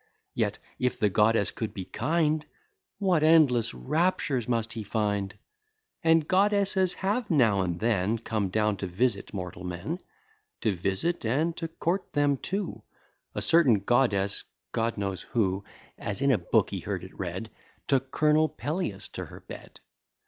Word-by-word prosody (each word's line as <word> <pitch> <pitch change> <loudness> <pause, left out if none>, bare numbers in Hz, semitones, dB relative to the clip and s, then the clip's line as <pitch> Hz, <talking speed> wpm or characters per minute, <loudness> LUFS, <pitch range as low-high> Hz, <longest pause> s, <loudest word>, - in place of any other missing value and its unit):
Yet, - - 0 0.2
if 125 -1 0
the 105 -2 +2
goddess 105 0 +3
could 110 - -5
be 95 - -5
kind, 155 - 0 0.5
What 185 -6 +2
endless 155 -7 +5
raptures 135 - 0
must 115 -2 0
he 115 - -4
find! 105 -2 -1 0.7
And 165 -1 +4
goddesses 195 -1 +3
have 210 +4 -1
now 115 - +4
and 90 -2 -2
then 110 -1 +1
Come 110 -3 -2
down 105 +1 +1
to 95 - -3
visit 100 +3 0
mortal 90 -2 -6
men; 90 - -4 0.6
To 110 - +2
visit 95 - 0
and 150 +9 +1
to 165 - -3
court 170 +3 -2
them 145 -1 +2
too: 195 +6 -4 0.5
A - - -1
certain 135 - +5
goddess, 100 -4 +2 0.3
God 115 0 -1
knows 100 -2 -2
who, 100 -5 0 0.4
(As 100 +2 -3
in 140 - +4
a 125 - +3
book - - +2
he - - -3
heard - - -4
it - - -10
read,) - - -5 0.4
Took 135 -1 +1
Col'nel 155 +2 +3
Peleus 145 - -3
to - - -6
her - - -12
bed. - - -11
120 Hz, 155 wpm, -28 LUFS, 100-160 Hz, 0.7 s, endless